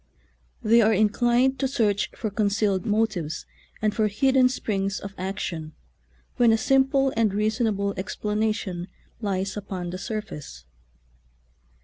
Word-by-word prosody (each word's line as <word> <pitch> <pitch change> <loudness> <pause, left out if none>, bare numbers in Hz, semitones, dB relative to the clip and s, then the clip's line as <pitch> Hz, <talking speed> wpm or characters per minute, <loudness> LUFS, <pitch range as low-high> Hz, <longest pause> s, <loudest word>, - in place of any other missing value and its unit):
They 230 +1 +5
are 220 0 +4
inclined 240 +5 +2
to 270 - +1
search 215 -7 +1
for 215 - -3
concealed 200 -2 +1
motives 205 -7 -1 0.4
and 215 -1 +2
for 215 -1 +2
hid 260 +6 +1
den 255 -1 +5
springs 200 -6 -2
of 200 -1 -8
action, 170 -4 -4 0.6
when 240 -2 +5
a 225 - +4
simple 270 +2 +3
and 225 -2 +2
reasonable 210 -1 0
explanation 210 -2 -2 0.3
lies 195 -2 -1
upon 190 -4 -5
the 185 - -5
sur 215 +1 -3
face. 145 - -10
210 Hz, 130 wpm, -25 LUFS, 195-230 Hz, 0.6 s, They